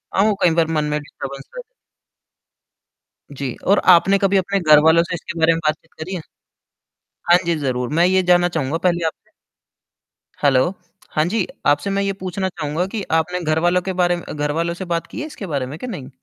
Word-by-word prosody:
हाँ, 195 - +4
वो 215 - +3
कई 170 -2 +4
बार 160 - +3
मन 150 - +1
में 150 - 0
डिस्टर्बेंस 140 -2 -9
रह - - -5 1.7
जी, 135 -3 -5
और 200 - +5
आपने 195 +3 +4
कभी 195 0 +2
अपने 195 +1 0
घरवालों 160 +1 +5
से 175 - -4
इसके 170 0 -7
बारे 165 +1 +4
में 165 - -2
बातचीत 155 +2 -2
करी 185 +4 -5
है? 170 - -5 1.1
हाँ 175 - +8
जी, 170 - +2
ज़रूर, 125 -3 -2
मैं 165 +3 +2
ये 190 0 +3
जानना 175 0 +4
चाहूँगा 160 -2 -2
पहले 170 -1 -1
आपसे। 160 - -7 1.1
हैलो 140 +5 +3 0.4
हाँ 155 - +1
जी, 205 +1 -1 0.2
आपसे 145 +7 +2
मैं 200 0 0
ये 195 0 -1
पूछना 190 0 -3
चाहूँगा 155 +1 -3
कि 210 +1 -4
आपने 165 +3 +1
घरवालों 170 +3 +1
के 190 +1 -4
बारे 175 0 +2 0.2
घरवालों 155 +3 -1
से 185 +2 -7
बात 165 - -2
की - - -7
है 305 - -4
इसके 215 -9 -8
बारे 140 -5 -2
में 140 +5 -8
कि 250 - -6
नहीं? 135 - -7
170 Hz, 195 wpm, -20 LUFS, 150-185 Hz, 1.7 s, हाँ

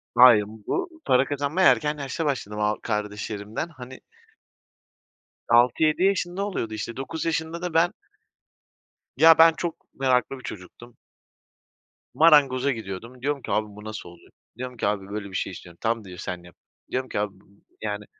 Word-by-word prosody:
Hayır 120 -4 +8
bu 320 - -5
para 130 +1 +4
kazanmaya 145 +6 +3
erken 150 0 0
yaşta 145 +4 -3
başladım 115 -7 -2
a 105 0 +1
kardeşlerimden. 105 +3 -3
Hani 130 -4 -11 1.5
6-7 125 +8 +4
yaşında 195 0 +1
oluyordu 115 - -3
işte 110 +2 -5
9 150 +4 -4
yaşında 165 +1 -2
da 180 -2 -4
ben 165 +2 +3 1.2
Ya 160 +2 +8
ben 165 0 +8
çok 170 0 -6
meraklı 130 0 +1
bir - - -15
çocuktum. 120 +3 -10 1.2
Marangoza 140 -4 +5
gidiyordum. 115 +2 -7
Diyorum 140 +1 -1
ki - - -6
abi 105 0 +1
bu 105 - -11
nasıl 110 -5 -7
oluyor? 85 0 -18 0.3
Diyorum 125 0 -6
ki 100 - 0
abi 100 -1 -2
böyle 100 -1 -5
bir 95 - -9
şey 95 - -2
istiyorum. 85 -1 -11
Tamam 115 -1 -1
diyor 90 -2 -10
sen 90 -1 -5
yap. 85 0 -16 0.4
Diyorum 130 0 -2
ki - - -2
abi, 105 -1 -2 0.5
yani, 105 -1 -4
125 Hz, 155 wpm, -25 LUFS, 105-155 Hz, 1.5 s, Hayır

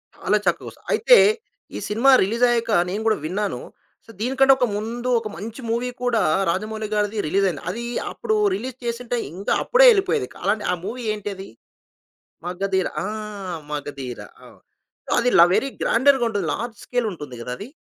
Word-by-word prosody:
చాలా - - +1
చక్కగొస్త - - -2
అయితే - - +6 0.6
ఈ - - -3
సినిమా 235 +6 +4
రిలీజయ్యాక 235 +2 +1 0.2
నేను 205 +4 -3
గూడా 220 -1 +3
విన్నాను. 200 +5 -2 0.5
సో, 225 - -13
దీనికన్నా 270 +3 +4
ఒక 250 - +2
ముందు 235 +4 -3
ఒక 220 - -6
మంచి 225 +5 -7
మూవీ 240 +2 -1
కూడా 235 -3 +2 0.3
రాజమౌళి 215 +4 -2
గారిది 210 +1 0
రిలీజయింది. 190 -4 0
అదీ 235 +5 -4 0.3
అప్పుడు 435 - -2 0.2
రిలీజ్ 260 -6 -6
చేసుంటే 240 +1 -2 0.2
ఇంకా 195 +3 -2
అప్పుడే - - +5
ఎళ్ళిపోయేది. 390 - 0 0.2
అలాంటి 205 +2 0
ఆ - - +1
మూవీ 240 +4 -5
ఏంటది? 200 -2 -6 1.0
'మగధీర' 190 +1 -1
ఆ! - - -2 0.6
'మగధీర'. 140 -4 -6 0.2
అవును. - - -16 0.6
అదిల 240 -8 +5
వెరీ 275 +7 +1
గ్రాండర్‌గుంటది. 235 - +2
లార్జ్ 230 -1 -5
స్కేలుంటుంది 185 - -3
గద 120 - -7
అది. 215 - -8
220 Hz, 140 wpm, -22 LUFS, 195-245 Hz, 1.0 s, అయితే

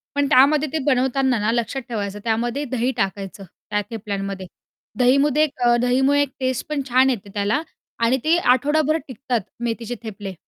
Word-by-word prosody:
पण 285 0 +2
त्यामध्ये 295 +3 +5
ते 320 - 0
बनवताना 265 -2 +2
ना 210 +2 +1
लक्षात 235 +3 -1
ठेवायचं 205 -3 -4
त्यामध्ये 240 +4 -1
दही 255 0 0
टाकायचं 195 0 -3
त्या 205 +3 -5
थेपल्यांमध्ये. 195 -4 -5 0.5
दहीमध्ये 275 +4 +4
अ, - - +5 0.3
एक 240 - +2
दहीमुळे 265 +3 +3
एक 285 - 0
टेस्ट 260 -2 -1
पण 300 -2 -1
छान 260 +2 +4
येते 210 -6 -3
त्याला 210 +8 0 0.4
आणि 240 +3 +3
ते 325 +2 +3
आठवडाभर 300 +2 +2
टिकतात 255 -2 -2 0.2
मेथीचे 235 0 -3
थेपले. 205 -3 -6
245 Hz, 160 wpm, -22 LUFS, 215-275 Hz, 0.5 s, त्यामध्ये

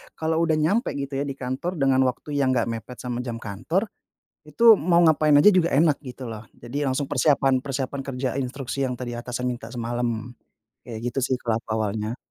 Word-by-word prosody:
kalau 160 0 -1
udah 160 -2 +2
nyampe 170 - +1
gitu 140 0 -4
ya 140 - -1
di 135 - -4
kantor 130 +8 -4
dengan 135 -1 +3
waktu 125 +4 -4
yang 130 -1 +2
nggak 115 -1 +1
mepet 115 +2 -7
sama 125 -1 -3
jam 125 -2 -4
kantor, 120 - -2 0.6
itu 225 +9 +6
mau 170 +2 +3
ngapain 155 -2 +4
aja 180 +8 +8
juga 170 -2 +3
enak 150 0 +4
gitu 130 -1 -8
loh, 110 -1 -7
jadi 120 +4 -9
langsung 135 +2 -1
persiapan 135 -3 +3
persiapan 135 0 -3
kerja 130 -1 -2
instruksi 135 +1 -5
yang 125 - -3
tadi 120 -2 -5
atasan 125 +1 -4
minta 120 -2 -4
semalam. 120 -1 -3 0.6
Kayak 110 -2 -6
gitu 135 - -2
sih 130 - +1
kalo 115 -3 -1
aku - - -31
awalnya. 110 +1 -2
130 Hz, 195 wpm, -24 LUFS, 120-145 Hz, 0.6 s, aja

